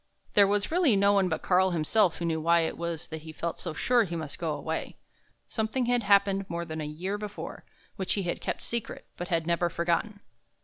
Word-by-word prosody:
There 200 -1 +6
was 205 +4 0
really 330 - +4
no 200 +1 +4
one 195 -2 +3
but 160 - -2
Karl 185 +1 +4
himself 175 +3 +2
who 170 - -3
knew 160 -1 0
why 170 +1 +4
it 160 - -1
was 170 -2 -4
that 160 -1 -6
he 160 +1 -9
felt 165 +2 -4
so 170 - -4
sure 245 -2 +3
he 175 -4 -4
must 155 -3 -5
go 165 -3 -1
away. 160 +1 -4 0.5
Something 225 +3 -1
had 245 0 +2
happened 200 -1 +3
more 170 0 -3
than 160 -1 -5
a 150 - -3
year 185 +7 -4
before, 210 -1 -7 0.3
which 190 - -1
he 200 - -1
had 175 - -3
kept - - -3
secret 235 -2 -4
but 175 - -5
had 165 -3 0
never 170 +1 +1
forgotten. 170 +5 -1
180 Hz, 220 wpm, -28 LUFS, 165-205 Hz, 0.5 s, There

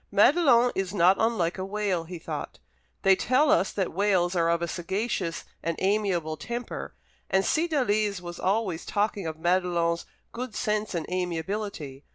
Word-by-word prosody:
"Madelon 250 - +5
is 195 +1 -2
not 185 +1 +5
unlike 205 -6 +1
a - - -2
whale," 195 -3 -1
he 175 +1 -7
thought. 160 - -6 0.5
"They 195 0 +6
tell 260 +9 +3
us 190 - +3
that 190 -5 -2
whales 185 -1 +2
are 165 -1 +2
of 170 0 +1
a - - 0
sagacious 185 0 -2 0.2
and 165 0 -2
amiable 190 -6 0
temper, 240 +8 -5 0.3
and 190 0 +2
Cydalise 215 - +1
was 175 -1 -8
always 190 -4 0
talking 205 -3 -1
of 160 -1 -5
Madelon's 175 -1 +1 0.2
good 245 -2 -6
sense 215 -3 -1
and 165 - -2
amiablity. 180 -4 -3
190 Hz, 155 wpm, -27 LUFS, 170-215 Hz, 0.5 s, They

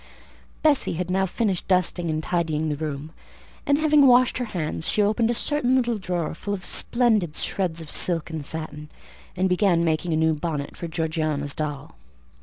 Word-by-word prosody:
Bessie 300 -3 +3
had 180 +2 -3
now 190 +1 +1
finished 195 -2 -1
dusting 180 -2 +1
and 155 0 -1
tidying 160 -3 -1
the 150 - -1
room, 150 0 -5 0.6
and 285 - +4
having 300 -2 +5
washed 250 0 +5
her 250 - -1
hands, 160 -5 -3
she - - 0
opened 215 +2 +2
a - - +2
certain 260 -1 +2
little 240 -4 +1
drawer, 175 -4 -2
full 200 +5 -4
of 185 - -9
splendid 220 -10 +1
shreds 170 -4 -2
of 160 - -9
silk 165 -2 -1
and 160 -2 -4
satin, 150 0 -6 0.5
and 185 +1 +2
began 180 -2 +2
making 160 +1 0
a - - +2
new 160 0 +3
bonnet 150 -2 -4
for 170 - -6
Georgiana's 155 -3 -2
doll. 150 -3 -4
170 Hz, 180 wpm, -24 LUFS, 155-210 Hz, 0.6 s, having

